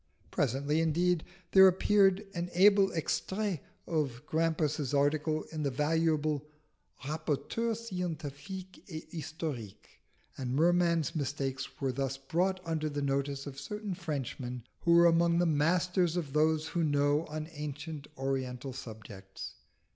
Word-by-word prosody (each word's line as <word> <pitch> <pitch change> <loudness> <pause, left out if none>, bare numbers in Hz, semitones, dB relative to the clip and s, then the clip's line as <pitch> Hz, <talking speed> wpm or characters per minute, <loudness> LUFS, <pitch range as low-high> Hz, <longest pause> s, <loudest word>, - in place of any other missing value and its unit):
Presently, 140 +4 +1
indeed, 170 +1 +2 0.3
there 190 0 +9
appeared 195 +1 +4
an 175 0 -3
able 200 +1 +6
extrait 190 +3 -1 0.3
of 145 -6 -1
Grampus's 155 -3 0
article 150 +2 +2
in 155 -1 -4
the 145 - +1
valuable 155 +1 +1 0.6
Rapporteur 160 +10 -1
scientifique 180 -3 -6
et 160 -2 -7
historique, 150 - -6 0.4
and 130 -1 -2
Merman's 170 0 +3
mistakes 135 -2 -3
were 135 -2 0
thus 135 +1 -2
brought 180 +8 0
under 160 -2 -1
the 145 -1 -3
notice 140 0 -1
of 135 -1 -7
certain 210 +2 -4
Frenchmen 135 -7 -4 0.2
who 170 0 +4
are 170 - +7
among 170 0 +4
the 175 - +3
masters 175 +3 +2
of 150 -6 -3
those 155 +1 +2
who 170 - 0
know 145 +1 +2
on 155 0 -5 0.7
oriental 130 -1 -2
subjects. 105 -6 -9
155 Hz, 125 wpm, -31 LUFS, 140-175 Hz, 0.7 s, there